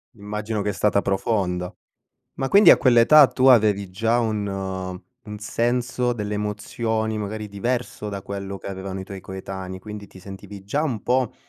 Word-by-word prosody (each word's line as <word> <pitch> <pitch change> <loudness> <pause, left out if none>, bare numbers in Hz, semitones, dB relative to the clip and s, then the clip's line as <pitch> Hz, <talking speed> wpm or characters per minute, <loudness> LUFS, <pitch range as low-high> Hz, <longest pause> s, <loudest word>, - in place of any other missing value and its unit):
Immagino 105 +1 -4
che 105 - -1
è - - +1
stata 100 +1 +1
profonda. 95 -3 -1 0.6
Ma 135 - -2
quindi 200 +6 +7
a - - +9
quell'età 130 +4 +7
tu 130 - +1
avevi 105 -6 +4
già 115 +5 +1
un 95 -4 -3 0.3
un 105 0 -6
senso 120 +2 0
delle 105 -2 -3
emozioni, 110 +1 -2
magari 105 +1 -5
diverso 120 +1 -3
da 100 -1 -5
quello 100 0 -5
che - - -11
avevano 95 0 -5
i - - -6
tuoi 95 0 -8
coetanei, 95 0 -7
quindi 105 +1 -9
ti 95 - -15
sentivi 100 +1 -10
già 140 +10 -1
un 130 -9 -2
po' 125 -1 +1
105 Hz, 165 wpm, -23 LUFS, 95-115 Hz, 0.6 s, a